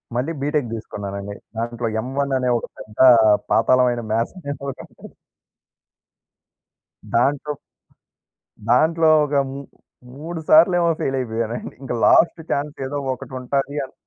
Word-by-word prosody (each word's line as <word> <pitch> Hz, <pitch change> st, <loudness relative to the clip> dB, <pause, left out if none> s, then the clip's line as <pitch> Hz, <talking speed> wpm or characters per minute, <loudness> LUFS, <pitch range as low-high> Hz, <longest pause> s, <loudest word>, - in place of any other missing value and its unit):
మళ్ళీ 130 Hz, +7 st, -1 dB
బీటెక్ 145 Hz, -3 st, -1 dB
తీసుకున్నానండి. 100 Hz, -2 st, -6 dB, 0.2 s
దాంట్లో 120 Hz, +1 st, -3 dB
ఎమ్ 125 Hz, -, -7 dB
వన్ 140 Hz, -1 st, 0 dB
అనే 125 Hz, -1 st, 0 dB
ఒక -, -, -7 dB
పెద్ద 105 Hz, 0 st, -12 dB, 0.5 s
పాతాళమైన 125 Hz, +1 st, +3 dB
మాథ్స్ 115 Hz, +7 st, -1 dB
అనే 145 Hz, -5 st, -5 dB, 0.2 s
ఒకటుంటది 135 Hz, -, -11 dB, 2.0 s
దాంట్లో, 140 Hz, +4 st, +1 dB, 1.2 s
దాంట్లో 160 Hz, +6 st, +4 dB, 0.2 s
ఒక 145 Hz, 0 st, -3 dB, 0.2 s
మూ 140 Hz, +1 st, -7 dB, 0.5 s
3 165 Hz, +4 st, -6 dB
సార్లు 170 Hz, +3 st, +6 dB
ఏమో 170 Hz, -1 st, +2 dB
ఫెయిల్ 135 Hz, -, -1 dB
అయిపోయానండి. 115 Hz, -1 st, -4 dB
ఇంకా 130 Hz, -, -4 dB
లాస్ట్ 170 Hz, -, +4 dB
ఛాన్స్ 145 Hz, +1 st, -2 dB
ఏదో 140 Hz, +2 st, -4 dB, 0.2 s
ఒకటుంటది 135 Hz, +2 st, -4 dB
అన్ 130 Hz, -, -18 dB
130 Hz, 120 wpm, -21 LUFS, 120-145 Hz, 2.0 s, సార్లు